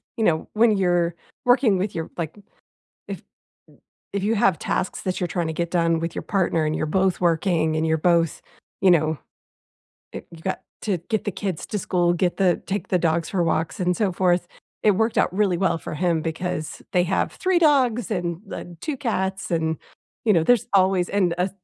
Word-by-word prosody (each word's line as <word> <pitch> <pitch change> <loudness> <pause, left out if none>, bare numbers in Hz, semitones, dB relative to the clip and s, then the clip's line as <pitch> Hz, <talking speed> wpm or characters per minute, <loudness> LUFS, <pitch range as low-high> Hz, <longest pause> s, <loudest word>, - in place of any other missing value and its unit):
you 225 - -1
know, 160 -5 +1
when 220 -1 +4
you're 175 -2 +1 0.3
working 245 -6 +4
with 195 +1 -2
your 165 -1 -4
like, 165 +2 -4 0.7
if - - -6 0.9
if 200 -1 -1
you 220 +2 +1
have 195 -5 +2
tasks 185 - -2
that 185 -1 -2
you're 180 - -1
tryna 165 -2 -2
get 170 0 -2
done 165 -2 +2
with 165 0 -3
your - - -3
partner 175 -5 +1
and 155 0 0
you're 155 - -1
both 190 +3 +1
working 165 -2 +1
and 155 +1 0
you're 160 0 +2
both 170 -1 +2 0.4
you 190 -1 +6
know, 155 -2 +2 1.0
eh, - - -5
you've 165 -1 -12
got 190 - -3 0.2
to 195 -5 0
get 220 -2 -1
the 205 - -1
kids 185 -3 -4
to 210 - -3
school, 175 -2 +1
get 175 0 0
the 185 -3 +2
take 200 -1 -3
the 180 - +2
dogs 165 0 0
for 185 -3 +1
walks 160 0 -1
and 180 -1 +1
so 205 -4 +1
forth. 175 -1 +1 0.3
It 210 - +5
worked 220 +4 +1
out - - +2
really 195 -3 +2
well 175 -3 +1
for - - -7
him 170 0 +1
because 165 -1 -4
they 180 -1 +3
have 185 - 0
3 370 -1 +1
dogs 255 -7 +3
and 175 -4 -2
the 175 -1 -8
2 305 -3 -3
cats 195 -7 -2
and, 160 -1 0 0.5
you 215 - +6
know, 165 - +3
there's 240 +3 +3
always, 185 -2 +3
and 185 -4 +1
a 180 +2 +1
180 Hz, 200 wpm, -23 LUFS, 165-200 Hz, 1.0 s, you